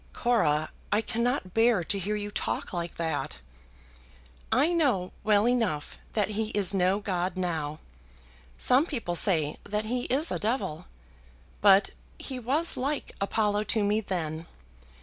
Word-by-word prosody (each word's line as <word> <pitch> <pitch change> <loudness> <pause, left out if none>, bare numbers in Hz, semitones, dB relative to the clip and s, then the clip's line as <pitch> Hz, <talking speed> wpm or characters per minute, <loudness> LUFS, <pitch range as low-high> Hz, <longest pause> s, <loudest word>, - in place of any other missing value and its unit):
"Cora! 155 -11 +1 0.2
I 210 - +3
cannot 235 -4 -1
bear 225 -4 +3
to 200 +4 -2
hear 205 +3 -2
you 205 0 -4
talk - - -3
like 170 -1 -3
that." 165 -1 -2 1.1
"I 305 +6 +3
know 255 - +1
well 210 +1 +4
enough 225 -12 0
that 210 -2 +1
he 215 +1 -1
is 200 -2 +2
no 190 0 +2
god 185 -2 -2
now; 160 -5 -2 0.8
some 265 +6 +4
people 230 - -3
say 160 -4 +2
that 210 +1 -2
he 245 +2 -2
is 290 +6 +3
a - - -1
devil, 215 - -2 0.7
but 195 -1 +6 0.3
he 260 -2 -5
was 285 +8 +1
like 280 +3 -2
Apollo 210 +1 +1
to 215 0 +1
me 210 +2 +2
then. 165 -5 -3
205 Hz, 145 wpm, -28 LUFS, 180-240 Hz, 1.1 s, but